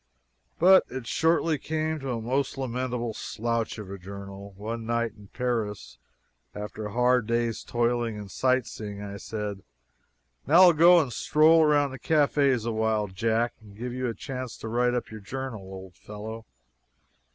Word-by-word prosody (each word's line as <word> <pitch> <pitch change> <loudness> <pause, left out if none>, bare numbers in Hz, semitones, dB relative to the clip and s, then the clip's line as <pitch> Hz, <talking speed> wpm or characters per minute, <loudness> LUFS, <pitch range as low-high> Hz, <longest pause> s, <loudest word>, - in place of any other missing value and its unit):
But 185 +2 +7
it 130 -1 -6
shortly 160 +3 +2
became 155 +1 -2
a 120 -3 -2
most 130 +5 -1
lamentable 125 -2 -2
"slouch 115 +1 -2
of 105 -3 -8
a 100 - -7
journal." 100 +1 -9
One 115 +3 -5
night 115 -1 0
in 105 -2 -15
Paris, 105 - -3 0.6
after 105 +1 -5
a - - -8
hard 125 0 +2
day's 115 -1 0
toil 120 0 0
in 105 -3 -5
sightseeing, 110 -3 -1
I 100 0 -6
said: 105 -2 -5 0.9
"Now 165 +6 +7
I'll 180 -2 +8
go 170 +3 +7
and 135 -7 -1
stroll 155 +7 +4
around 145 -2 +3
the 130 - -8
cafes 140 -6 +2
awhile, 110 -2 0
Jack, 115 +5 0
and 105 -2 -15
give 120 +2 -5
you 130 0 -2
a 115 - -3
chance 130 +1 -6
to - - -7
write 120 +2 +1
up 120 - -3
your 110 - -7
journal, 130 +1 -5
old 95 -1 -10
fellow." 110 +4 -9
115 Hz, 160 wpm, -27 LUFS, 105-130 Hz, 0.9 s, I'll